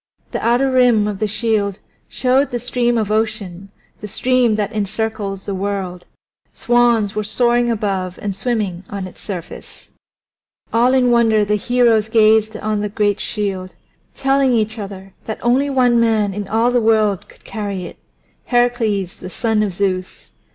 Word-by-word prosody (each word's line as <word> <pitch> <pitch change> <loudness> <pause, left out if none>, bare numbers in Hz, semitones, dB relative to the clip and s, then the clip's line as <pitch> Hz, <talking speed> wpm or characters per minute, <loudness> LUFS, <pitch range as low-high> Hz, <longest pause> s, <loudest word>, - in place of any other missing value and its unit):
The - - -4
outer 245 +3 +2
rim 245 -5 +4
of 205 -2 -4
the 215 - 0
shield 210 -2 0 0.3
showed 255 +4 +1
the 245 - -2
Stream 240 0 0
of 215 -2 -1
Ocean, 210 -4 -2 0.3
the 210 - -7
stream 250 +1 +1
that 210 0 -2
encircles 210 -1 -3
the 200 - -3
world; 190 -2 -4 0.5
swans 240 -4 +2
were 215 - -2
soaring 240 +2 +1
above 195 -5 -2
and 200 -2 -4
swimming 195 -4 -2
on 200 -2 -5
its 185 - -12
surface. 180 -5 -9 0.8
All 245 +3 +4
in 250 -2 +3
wonder 225 -3 +3
the 210 - 0
heroes 225 0 +2
gazed 220 -1 +3
on 215 -1 -2
the 210 - -2
great 205 0 0
shield, 195 -4 -3 0.4
telling 270 -1 +2
each 220 0 0
other 195 -1 -8
that 220 - -4
only 260 +4 +2
one 250 -3 +3
man 220 -3 +2
in 205 0 -5
all 225 +3 +2
the 245 -1 +2
world 215 -3 +1
could - - -19
carry 200 -4 -5
it - - -10 0.5
Heracles 235 -6 0
the - - -8
son 220 +1 0
of 210 -2 0
Zeus. 185 0 -3
215 Hz, 160 wpm, -18 LUFS, 200-240 Hz, 0.8 s, rim